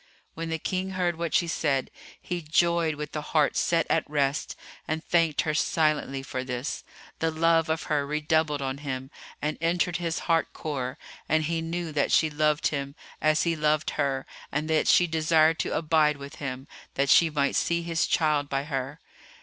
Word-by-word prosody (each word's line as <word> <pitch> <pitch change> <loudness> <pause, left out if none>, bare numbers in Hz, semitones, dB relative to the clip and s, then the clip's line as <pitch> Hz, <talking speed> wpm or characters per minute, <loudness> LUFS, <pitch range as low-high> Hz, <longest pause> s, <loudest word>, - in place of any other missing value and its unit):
When 165 0 -5
the 160 - -1
King 185 +3 -2
heard 175 -2 +1
what 170 0 -3
she 170 - +3
said, 140 -5 0 0.3
he 175 -1 -4
joyed 165 0 +2
with 150 +1 -6
a 150 - -1
heart 150 -1 +1
set 165 -2 +2
at - - 0
rest 145 -1 0 0.3
and 160 +1 -2
thanked 165 -3 +2
her 155 - -1
silently 150 -3 +1
for 130 -1 -4
this; 125 +2 -4 0.4
the 165 - +1
love 165 0 +2
of 160 0 -1
her 150 -2 0
redoubled 150 -1 0
on 135 +1 -3
him 135 -1 -5 0.3
and 150 +1 -2
entered 170 +1 +1
his 170 -2 -2
heart 165 -1 +1
core 130 -5 -4 0.3
and 155 +1 +3
he 165 +1 -1
knew 165 0 -3
that 145 -1 0
she 155 -1 +4
loved 150 0 +2
him 140 -1 -4 0.3
as 155 0 +3
he 170 -1 +1
loved 155 +1 +1
her 135 -1 -1 0.3
and 150 +2 -1
that 155 - +2
she 180 - +6
desired 160 0 +3
to - - -1
abide 155 -2 +2
with 140 0 -10
him, 130 -1 -5 0.3
that 140 0 +2
she 165 - +6
might 140 -2 0
see 170 0 +1
his 165 0 0
child 150 -3 +1
by 135 0 -1
her. 140 0 -4
155 Hz, 185 wpm, -27 LUFS, 145-165 Hz, 0.4 s, she